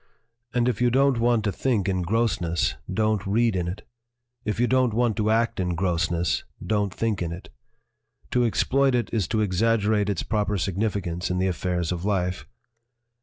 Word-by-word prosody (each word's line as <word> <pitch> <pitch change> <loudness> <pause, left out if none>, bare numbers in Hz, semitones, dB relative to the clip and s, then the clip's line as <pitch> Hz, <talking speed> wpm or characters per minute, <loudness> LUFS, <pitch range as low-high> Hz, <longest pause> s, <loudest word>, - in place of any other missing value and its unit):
"And 120 0 +1
if 120 -2 -1
you 125 - +4
don't 135 0 +3
want 120 -1 +2
to 100 - 0
think 105 -1 0
in 95 -2 0
grossness, 90 -4 0
/ - - -11
don't 110 -2 +1
read 115 +1 +2
in 90 -2 -1
it; 90 +3 -6 0.6
if 105 +1 -2
you 120 - +4
don't 125 -3 +2
want 120 -2 +2
to 110 0 +1
act 115 -1 +1
in 90 -2 -1
gross 85 -2 +1
If 85 - -5
ness, 85 -5 0 0.2
don't 105 -2 0
think 110 0 -1
in 85 -1 -2
it. 85 +2 -8 0.8
To 125 - +2
exploit 135 +3 +2
it 120 -4 -1
is 105 -7 0
to 110 -1 +1
exag 115 +4 +2
gerate 105 -1 +1
its 100 - -1
proper 105 -2 0
significance 95 -1 -2
in 90 - -1
the 95 - +1
affairs 90 -2 -1
of 90 -1 -3
life. 95 -2 -1
105 Hz, 195 wpm, -25 LUFS, 90-115 Hz, 0.8 s, you